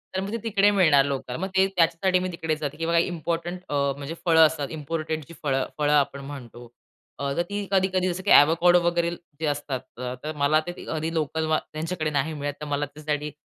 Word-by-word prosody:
तर - - +1
मग 195 - -4
ते 230 - -1
तिकडे 205 -2 +3
मिळणार 155 -8 +5
लोकल. 140 -2 -3
मग 190 - -1
ते 190 0 +5
त्याच्यासाठी 185 0 +2
मी 185 0 -2
तिकडे 160 -2 -2
जाते 150 -1 -5
किंवा 165 +1 +1
इम्पॉर्टंट 170 +1 -1
अ, - - -3 0.2
म्हणजे 140 +3 -6
फळं 160 -2 +7
असतात, 150 -3 -1
इम्पोर्टेड 155 0 -3
जी 170 - -11
फळं-फळं 145 +2 0
आपण 140 -1 +2
म्हणतो, 120 -4 -9 0.5
अ, 140 0 -1 0.2
ती 205 0 -3
कधी-कधी 190 -1 +2
जसं 180 +2 -4
की 205 - +1
आवाकाडो 170 +4 +6
वगैरे 170 0 +1 0.3
जे 160 - -2
असतात 140 -3 -2 0.4
तर 155 - -3
मला 150 +2 +3
ते - - -2 0.2
कधी 160 +1 -2
लोकल 160 0 -1
मा 155 0 +3 0.2
त्यांच्याकडे 155 0 -2
नाही 150 +2 -1
मिळत 145 -1 -3
तर - - -4
मला 145 0 -1
त्याच्यासाठी 150 +1 -4
160 Hz, 195 wpm, -25 LUFS, 145-175 Hz, 0.5 s, फळं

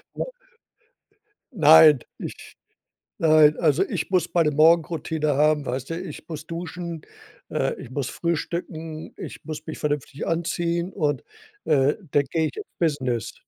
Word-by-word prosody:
ja. - - -2 1.3
Nein, 155 - +8 0.2
ich - - -9 0.6
nein, 155 -2 +5
also, 150 -4 +3
ich - - -3
muss 180 -2 +1
meine 165 -3 +3
Morgenroutine 160 -1 +2
haben, 150 0 +3
weißt 130 +3 -4
du, 165 - -3
ich 165 -6 -9
muss 155 -1 -7
duschen, 170 -1 -6 0.5
äh, - - -1
ich - - -10
muss 135 -2 -3
frühstücken, 165 -1 -4
ich - - -8
muss 155 -1 -7
mich 155 - -5
vernünftig 145 -1 -3
anziehen 170 +1 -1
und, 150 -6 -1 0.4
äh, 140 -1 +3 0.2
dann 145 - +3
gehe 160 -1 +1
ich - - -9
ins 420 0 -6
Business. 130 - -1
155 Hz, 140 wpm, -24 LUFS, 150-170 Hz, 1.3 s, Nein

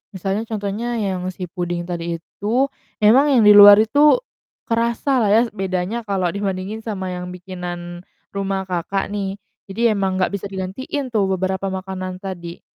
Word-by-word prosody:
misalnya 195 +4 -2
contohnya 220 +3 -3
yang 190 -4 -2
si 185 0 -7
puding 175 -1 -3
tadi 170 -1 -4
itu, 235 +10 -1 0.3
emang 255 +7 +6
yang 245 -5 +4
di 210 - +8
luar 205 0 +11
itu 290 - +5 0.5
kerasa 235 +3 0
lah 215 -4 +2
ya 220 - +6
s 225 - -14
bedanya 190 +3 -2
kalau 185 -3 0
dibandingin 200 +1 -3
sama 195 -4 -4
yang 180 0 -5
bikinan 175 -1 -7 0.3
rumah, 195 -1 -2
Kakak, 190 +2 -3
nih 195 -2 -3 0.3
jadi 230 +4 +1
emang 195 -2 0
gak 185 +1 0
bisa 200 0 -4
digantiin 215 +8 -5
tuh 205 -4 +1
beberapa 190 +1 -1
makanan 185 -1 -5
tadi. 175 -3 -7
195 Hz, 160 wpm, -20 LUFS, 185-215 Hz, 0.5 s, luar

